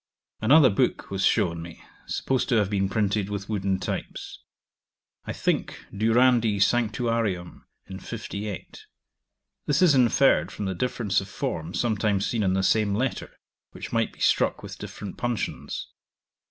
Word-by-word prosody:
Another 130 +3 +6
book 100 - 0
was 100 0 -1
shown 85 -4 +2
me, 85 0 -10 0.3
supposed 130 +1 -1
to 125 - +3
have 105 -2 +2
been 95 -1 +1
printed 105 -1 0
with 100 -1 -4
wooden 100 -3 0
types; - - -5 0.9
I - - -4
think, - - -1
Durandi 115 0 +3
Sanctuarium 115 -4 0 0.2
in 95 0 -8
58. 105 -4 -7 0.8
This 145 +4 +3
is 170 -5 +6
inferred 130 +1 +4
from 105 - -5
the 95 - -1
difference 105 -1 0
of 95 - -9
form 80 +3 -4
sometimes 105 -2 +1
seen 115 - -1
in 95 -2 +2
the 95 0 +1
same 105 -1 +2
letter, 125 +4 -2 0.4
which - - -8
might - - +1
be - - -21
struck - - +2
with - - -9
different 100 -2 -8
puncheons. 120 -2 -3
105 Hz, 145 wpm, -26 LUFS, 95-120 Hz, 0.9 s, Another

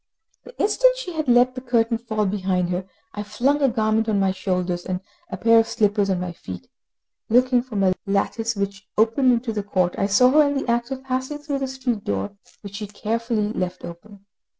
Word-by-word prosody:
The - - -14
instant - - +3
she 435 -8 -6
had 310 -3 -3
let 245 +1 +5
the 255 - -6
curtain 230 -2 +1
fall 220 -3 -1
behind 185 -2 0
her, 185 +1 -3 0.2
I 210 - -4
flung 250 +8 0
a 275 - +4
garment 220 -1 +1
on 205 -2 +2
my 195 -1 +2
shoulders 180 -2 -2
and 185 -1 -3 0.3
a - - -5
pair 230 0 +5
of 225 - +2
slippers 210 -3 +1
on 185 -2 +1
my 180 -1 -3
feet. 90 - -9 0.6
Looking 250 +2 +4
from 220 -6 -3
a 185 -1 +4
lattice 225 +3 0
which 200 +1 -4
opened 225 +4 +4
into 235 -1 0
the 210 - -2
court, 185 -3 0
I 195 - +2
saw 250 +6 +5
her 305 +2 +6
in 285 0 -1
the 275 - -3
act 235 +1 0
of 265 -1 -5
passing 260 +2 -3
through 290 -2 -3
the 270 - -2
street 255 -5 -3
door, 100 -1 -2 0.3
which 200 -1 -8
she 210 -1 -5
carefully 215 +1 -2
left 180 -2 -3
open. 200 +4 -12
220 Hz, 210 wpm, -23 LUFS, 195-255 Hz, 0.6 s, her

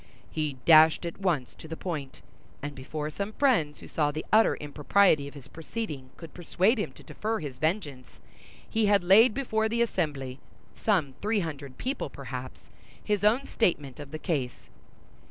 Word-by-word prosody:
He 155 -4 -2
dashed 160 +1 +7
at 170 - -6
once 150 -12 0
to 160 - -12
the 160 0 -6
point; 150 -7 -5 0.4
and 145 0 -4
before 150 +3 -5
some 200 +6 -4
friends 215 - +2
who - - -10
saw 150 -2 +1
the 155 +2 -4
utter 220 +1 +5
impropriety 150 +1 +2
of 140 - -11
his 140 -2 -11
proceeding 160 - -6
could 165 - -11
persuade 185 +6 +1
him 210 - -2
to - - -15
defer 220 +1 -3
his 135 -5 -7
vengeance, 155 -6 -3 0.5
he 220 -1 +1
had 200 -2 +4
laid 210 +6 +6
before 220 -5 0
the 235 +1 +2
assembly—some 150 - -2
three 210 0 +1
hundred 145 -5 -6
people, 265 +3 -3
perhaps—his 135 - -6
own 230 +6 +3
statement 150 - -1
of 145 -2 -8
the 155 - -5
case. 140 -7 -3
160 Hz, 160 wpm, -28 LUFS, 145-210 Hz, 0.5 s, dashed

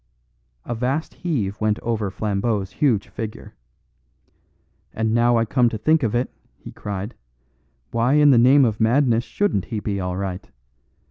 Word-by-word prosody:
A 120 - -3
vast 130 +7 -2
heave 110 - -3
went 110 -1 +1
over 110 -3 -2
Flambeau's 100 0 -2
huge 120 -9 +1
figure. 110 -2 -7 1.4
"And 110 0 0
now 120 0 +3
I 115 - +2
come 120 +1 +2
to 110 - -4
think 155 +8 +2
of 115 -3 0
it," 125 +2 -1 0.3
he - - -11
cried, 100 +3 -6 0.8
"why 120 +3 +1
in 150 -1 +6
the 120 - +5
name 130 +3 +6
of 110 -3 -1
madness 120 0 +3
shouldn't 205 - -1
he 110 - -4
be 100 -1 -3
all 90 -1 -3
right? 95 -2 -5
115 Hz, 155 wpm, -22 LUFS, 105-125 Hz, 1.4 s, in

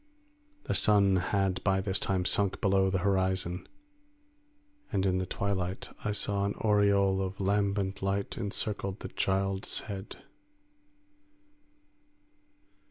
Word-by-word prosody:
The - - -2
sun 100 -2 +4
had 95 +1 0
by 95 -1 +2
this 95 0 0
time 95 -2 -1
sunk 100 0 +1
below 95 -1 +3
the 95 - 0
horizon, 95 -2 0 1.2
and 95 - +1
in 95 -1 +2
the 95 - -3
twilight 95 -2 -2
I 105 - 0
saw 100 -1 0
an 100 - -1
aureole 100 -2 +3
of 95 0 -4
lambent 100 0 0
light 100 +1 -1
encircled 100 -2 -3
the - - -6
child's 95 0 -1
head. 100 -2 -7
95 Hz, 115 wpm, -30 LUFS, 95-100 Hz, 1.2 s, sun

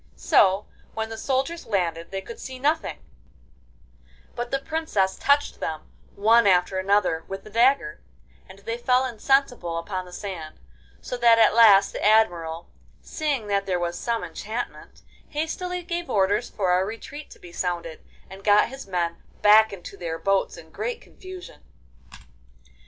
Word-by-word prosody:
So 195 +1 +3 0.3
when 220 0 -3
the 225 - -6
soldiers 270 +8 -2
landed 170 -5 -1
they 195 0 -4
could 230 +4 -10
see 260 -1 -7
nothing, 300 +5 0 1.4
but 240 0 -4
the 275 - 0
Princess 275 -11 -1
touched 285 +1 +1
them 155 -1 -5 0.2
one 225 +2 +4
after 185 0 +3
another 185 -4 +1
with 195 0 -6
the 215 - -13
dagger, 235 - +2 0.5
and 190 - -12
they 230 +4 -5
fell 250 +1 +2
insensible 245 -7 0
upon 185 +2 -4
the 180 - -13
sand, 180 -5 -7 0.4
so 250 - -5
that 235 -1 +5
at 220 -2 +5
last 205 -4 +6
the - - -5
Admiral, 175 -7 +2 0.3
seeing 290 -8 -2
that 200 -1 -1
there 180 -2 0
was 175 0 -2
some 230 +5 -2
enchantment, 225 +4 -6 0.3
hastily 355 +4 -3
gave 345 0 -4
orders 200 +1 +1
for 180 -3 +1
a - - +1
retreat 230 +8 -8
to - - -14
be 175 - -13
sounded, 170 -2 -4 0.2
and 190 +1 -12
got 210 +2 +4
his 270 -3 -9
men 170 -3 -2 0.2
back 215 +1 +7
into 195 0 -9
their 165 -3 -4
boats 195 +2 0
in - - -14
great - - -4
confusion. 370 -1 -12
210 Hz, 155 wpm, -24 LUFS, 185-255 Hz, 1.4 s, back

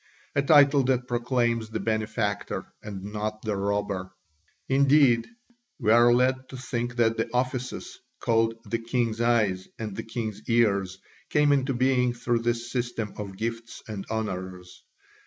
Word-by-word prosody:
a 140 - +2
title 140 -1 +6
that 125 -1 0
proclaims 120 -2 0
the - - -3
benefactor 110 -2 -2 0.2
and 100 -3 -7
not 105 +1 -4
the 110 -2 -1
robber. 100 -1 -2 0.6
Indeed, 135 -3 +4 0.5
we 105 - +2
are 120 +1 +6
led 130 +1 +2
to 130 - -8
think 120 -2 -3
that 115 -2 +2
the 115 - -1
offices 130 - -3 0.2
called 115 -1 +2
"the 115 +3 -2
king's 115 -1 -1
eyes" 110 -6 +2
and 110 -4 -5
"the - - -3
king's 110 -3 -5
ears" 100 -5 +2 0.3
came 150 -1 +3
into 135 -1 +1
being 125 -1 +2
through 120 0 0
this 120 +1 -2
system 120 -4 -3
of 100 -2 -6
gifts 115 +1 -5
and 105 -3 -5
honours. 95 -5 -5
115 Hz, 145 wpm, -26 LUFS, 105-125 Hz, 0.6 s, title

